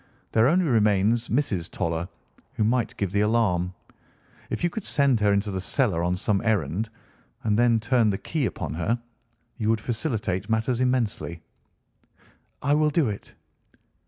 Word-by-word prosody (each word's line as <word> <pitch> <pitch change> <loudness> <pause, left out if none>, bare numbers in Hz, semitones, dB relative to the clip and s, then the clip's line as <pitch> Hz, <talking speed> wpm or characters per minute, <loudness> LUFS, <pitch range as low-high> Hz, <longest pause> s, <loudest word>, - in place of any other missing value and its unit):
There 110 +2 +4
only 175 +5 +3
remains 110 -2 +2
Mrs. 110 - 0
Toller, 85 +1 -2 0.4
who - - 0
might 120 +2 0
give 100 -3 -1
the 100 - +2
alarm. 105 -5 +2 0.8
If - - -3
you 175 - +3
could 220 - -5
send 140 - +2
her 105 -1 +3
into 100 +1 +1
the 95 -1 -3
cellar 100 - +1
on 90 +1 0
some 100 +1 0
errand, 105 -1 0 0.5
and 105 -2 +2
then 120 0 +4
turn 115 0 +2
the 95 - 0
key 150 +1 -1
upon 90 - -5
her, 95 +9 -1 0.6
you 110 -1 0
would 115 -1 +2
facilitate 110 - -2
matters 115 +3 +1
immensely." 115 -10 -1 1.2
"I 140 - +3
will 150 0 +3
do 150 -4 +2
it." 100 - -7
110 Hz, 160 wpm, -25 LUFS, 100-125 Hz, 1.2 s, There